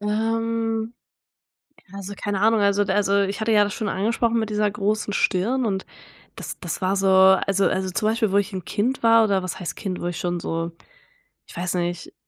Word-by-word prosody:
Ähm, 225 +1 -1 1.0
also, 200 0 -7
keine 205 -1 -3
Ahnung 220 -1 +4
also 200 0 +3
d 190 - -1
also, 200 0 +2
ich 200 +3 -3
hatte 225 - 0
ja 210 -1 +5
das 205 - -3
schon 215 -3 -3
angesprochen 230 +4 0
mit 220 -1 -2
dieser 210 0 +1
großen 210 +1 -1
Stirn 230 +8 +1
und 190 -3 -2 0.5
das - - -7
das 175 -1 -5
war 190 +1 +1
so 195 0 +1
also 190 +1 +4
also, 190 0 -1
zum 215 +4 0
Beispiel, 220 -3 0
wo 200 - +3
ich 205 +1 0
'n 185 - -4
Kind 240 +5 -1
war 230 0 +6
oder 195 -3 +1
was 185 - -5
heißt 175 - -5
Kind, 185 -4 -4
wo - - -4
ich 175 -2 -4
schon 175 -1 -2
so 165 +1 -3 0.8
ich - - -13
weiß 180 +1 -2
nicht, 175 -1 -3
200 Hz, 205 wpm, -23 LUFS, 190-220 Hz, 1.0 s, war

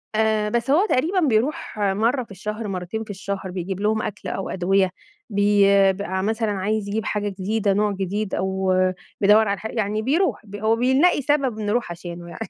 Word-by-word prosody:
آآ، 215 -1 +2
بس 235 +3 -1
هو 355 +8 +4
تقريبًا 340 +9 +2
بيروح 270 -2 0
مرّه 220 +6 +1
في 220 - -18
الشهر، 210 +3 -5
مرتين 190 +3 -4
في 215 - -17
الشهر، 195 -1 -5
بيجيب 185 +1 -4
لهم 215 +1 +1
أكل 205 - -5
أو 195 - -4
أدوية 190 +1 +2 0.4
بي 205 0 +3 0.3
ب 200 - -7
مثلًا 210 +3 -1
عايز 205 +1 -1
يجيب 215 +2 -2
حاجة 205 -1 -1
جديدة، 200 +1 0
نوع 210 +1 +1
جديد، 195 +2 -2
أو 190 0 0 0.5
بيدوّر 210 +2 +5
على 200 0 -1
حا 220 - -5
يعني 215 -1 -1
بيروح 325 - +1
ب 205 0 -10
هو 220 +2 +1
بيلاقي 265 +7 +3
سبب 270 -5 0
نروح 215 -2 -1
عشانه 170 0 -8
يعني، 225 - -7
210 Hz, 185 wpm, -23 LUFS, 195-225 Hz, 0.5 s, بيدوّر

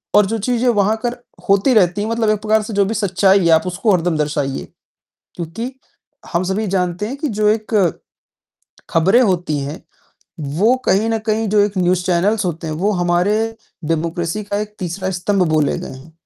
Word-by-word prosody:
और 210 - +6
जो 225 +3 -2
चीज़ें 245 0 +1
वहाँ 210 -1 +2
कर 240 0 -1 0.3
होती 200 +6 +4
रहती 195 -1 +3
हैं, 215 - -2
मतलब 230 -1 0
एक 215 -1 +1
प्रकार 215 0 +2
से 215 +1 -6
जो 200 0 +3
भी 210 - -2
सच्चाई 195 -2 +3
है, 170 - +3
आप 160 +3 +3
उसको 180 +5 0
हरदम 175 -2 +1
दर्शाइए। 145 -2 -2 0.7
क्योंकि 210 +10 -5 0.6
हम 170 +2 +1
सभी 195 +4 -1
जानते 180 +1 -1
हैं 265 +5 -5
कि 305 +1 -2
जो 210 0 0
एक 215 -5 0 0.9
खबरें 190 +9 +4
होती 175 - 0
हैं, 140 +3 -5 0.6
वो 165 - +2
कहीं 210 +4 +2
न 225 - 0
कहीं 220 +1 +1
जो 210 0 +3
एक 205 -1 +1
न्यूज़ 180 0 +1
चैनल्स 195 +4 +1
होते 165 -1 -3
हैं, 155 - -3
वो 190 +7 0
हमारे 180 +2 +1 0.5
डेमोक्रेसी 165 +5 -2
का 205 0 -3
एक 210 0 -7
तीसरा 185 +1 -3
स्तम्भ 185 0 0
बोले 155 -2 +1
गए - - -7
हैं, 145 +5 -15
195 Hz, 190 wpm, -18 LUFS, 175-215 Hz, 0.9 s, और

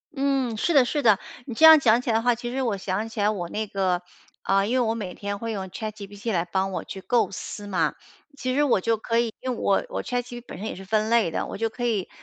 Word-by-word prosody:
嗯， 270 -4 0
是 340 - +1
的 275 -4 +6
是 290 +3 -1
的， 215 -4 +5 0.3
你 250 - -6
这 315 - +5
样 320 -1 +10
讲 235 -3 +4
起 250 - -4
来 225 - +2
的 225 - +3
话， 245 0 +4
其 240 +1 -5
实 265 +2 -2
我 225 -5 0
想 195 +3 -2
起 225 - -7
来 205 +1 +3
我 190 -5 -3
那 215 0 -3
个 185 -3 0 0.4
啊， 195 0 +2
因 225 - -1
为 255 - +3
我 225 -2 +1
每 195 -5 -5
天 200 0 -4
会 230 +2 -4
用 195 -3 -4
ChatGPT 205 +2 -6
来 170 -1 +1
帮 190 +2 -1
我 185 - -3
去 190 - -8
构 240 +4 +2
思 205 +2 -7
嘛， 170 -6 +1 0.4
其 255 -2 -2
实 295 - +3
我 245 -9 +3
就 225 +2 +1
可 230 +1 0
以 235 -2 -1
因 255 - -3
为 245 - -2
我 195 - +2
我 - - -3
ChatGPT 245 -1 -4
本 - - -8
身 205 - -6
也 - - -4
是 195 - -9
分 215 +3 0
类 235 -6 +4
的， - - -2
我 - - -6
就 225 0 0
可 240 +2 -4
以， 215 -6 0
220 Hz, 355 characters per minute, -25 LUFS, 195-245 Hz, 0.4 s, 样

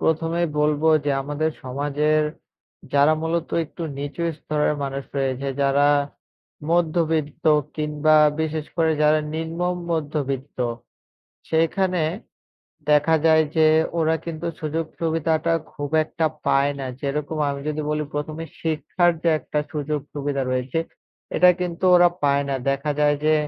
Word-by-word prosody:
১ম 160 0 +1
এই - - +3
বলবো 150 +1 +2 0.2
যে 145 - +1
আমাদের 150 +3 -1
সমাজের 145 +3 0 0.7
যারা 145 +2 +5
মূলত 165 0 -1 0.2
একটু 170 +3 -9 0.2
নিচু 145 +4 -4 0.2
স্তরের 150 0 0
মানুষ 135 0 -4
রয়েছে। 135 0 -1 0.2
যারা 140 +1 +3 0.8
মধ্যবিত্ত 165 -2 0 0.3
কিংবা 150 0 +2 0.3
বিশেষ 155 -1 -2
করে 160 -1 +3
যারা 150 +1 +5 0.2
নিম্ন 165 +1 -4 0.3
মধ্যবিত্ত। 145 -3 -3 0.9
সেখানে 175 +2 +1 0.9
দেখা 150 +2 +4
যায় 160 -1 +6
যে 160 -1 +5 0.3
ওরা 160 0 +2
কিন্তু 170 0 -4
সুযোগ 160 +1 -2
সুবিধাটা 165 0 +1 0.2
খুব 145 -1 -5
একটা 160 +1 -2 0.2
পায় 140 +1 +3
না। 135 - -4 0.2
যেরকম 150 +2 -2
আমি 140 0 -3
যদি 155 0 -2
বলি 150 0 0
১ম 150 +1 -3
এ - - -6 0.2
শিক্ষার 165 +2 +1
যে 170 - +4
একটা 150 +2 -2
সুযোগ 150 0 -2
সুবিধা 140 -1 -2
রয়েছে, 130 +5 -1 0.6
এটা 180 +2 +7
কিন্তু 180 0 -4
ওরা 175 0 +6
পায় 140 0 +3
না। 135 - 0
দেখা 140 +2 0
যায় 145 0 +4
যে 155 - +4
155 Hz, 135 wpm, -23 LUFS, 145-160 Hz, 0.9 s, এটা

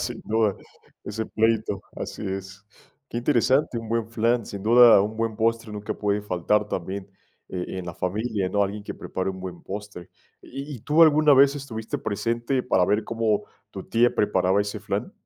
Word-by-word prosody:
Sin - - -4
duda. 110 -2 +1 0.5
Ese 110 +2 -4
pleito, 110 -3 0
así - - -6
es. 95 +1 -6 0.4
Qué 120 - -3
interesante, 130 0 +2
un 115 -1 -8
buen 115 -1 -1
flan, 115 0 +1
sin 100 -1 -7
duda 115 -1 +7
un 110 +2 -4
buen 115 -1 -2
postre 115 0 0
nunca 105 -1 -4
puede 105 0 -1
faltar 105 +2 0
también 95 +1 -5 0.4
e 95 0 -5
en 90 - -5
la 85 - -5
familia, 100 +1 -2
¿no? 100 +2 +1
Alguien 100 +1 -3
que - - -6
prepare 95 +1 -4
un 95 -1 -5
buen 90 -2 -7
postre. 100 -3 -8 0.3
¿Y 140 +2 -7
y 115 - -14
tú 155 +6 +4
alguna 155 -2 +6
vez 140 +1 +5
estuviste 115 -6 -5
presente 115 +5 -1
para 95 -8 +2
ver 105 +2 +2
cómo 110 -2 0 0.3
tu - - -7
tía 120 +1 +2
preparaba 100 -1 +2
ese 105 0 -3
flan? - - -3
110 Hz, 180 wpm, -25 LUFS, 100-115 Hz, 0.5 s, duda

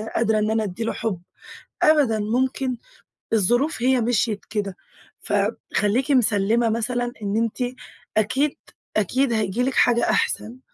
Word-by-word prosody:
قادرة 220 -1 +2
إن 215 +1 0
أنا 220 0 +1
أدي 200 +2 -4
له 225 - -1
حب. 195 -6 -3 0.6
أبدًا، 280 -9 +4
ممكن 255 +4 0 0.6
الظروف 240 - +2
هي 255 -1 +3
مشيت 225 -2 0
كده. 200 -3 -3 0.4
فخلّيكِ 235 +8 0
مِسلّمة 230 -2 +3
مثلًا 240 +2 -1
إن 200 +2 -1
أنتِ 245 +2 -1 0.4
أكيد، 265 +7 +1 0.4
أكيد 245 +5 +1
هَييجي 215 +1 0
لِك 265 +1 0
حاجة 240 -1 +3
أحسن. 235 +4 -1
230 Hz, 130 wpm, -23 LUFS, 215-250 Hz, 0.6 s, أبدًا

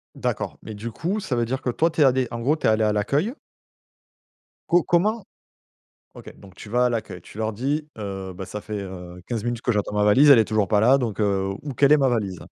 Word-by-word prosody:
D'accord, - - -3
mais 110 - -7
du 115 +3 -6
coup, 190 - -2
ça 130 -10 -3
veut 120 - +1
dire, 130 +3 -3
que 125 - -2
toi, 165 +7 +1
tu 160 - -7
es - - +7
allée, 130 -1 +2
en 120 - -5
gros, 140 +7 +1
tu - - -1
es - - +5
allée 110 0 +2
à 105 - +1
l'accueil? 145 - 0 1.3
Co 175 0 +5
comment 205 +5 +1 0.9
OK, - - -12
donc 95 -2 -15
tu 105 - -12
vas 125 +1 +3
à - - +3
l'accueil, 110 -6 -4
tu - - -15
leur 110 0 -2
dis, 140 +7 -2
heu: 95 -2 -5
«Bah 95 0 -7
ça 105 +2 -7
fait, 105 -1 -5
heu, 90 -2 -9
15 115 -2 -3
minutes 120 -1 -2
que 120 - -1
j'attends 105 -2 -1
ma 105 - +1
valise, 135 +8 +6
elle 130 - +9
est 110 - +4
toujours 110 -2 +1
pas 105 +1 +3
là, 125 +5 +5
donc, 115 -5 -3
heu, 95 -1 0
où 145 -3 -7
quelle 140 +3 +4
est 150 - +6
ma 135 -1 +3
valise?» 100 -7 -2
115 Hz, 255 wpm, -23 LUFS, 105-140 Hz, 1.3 s, elle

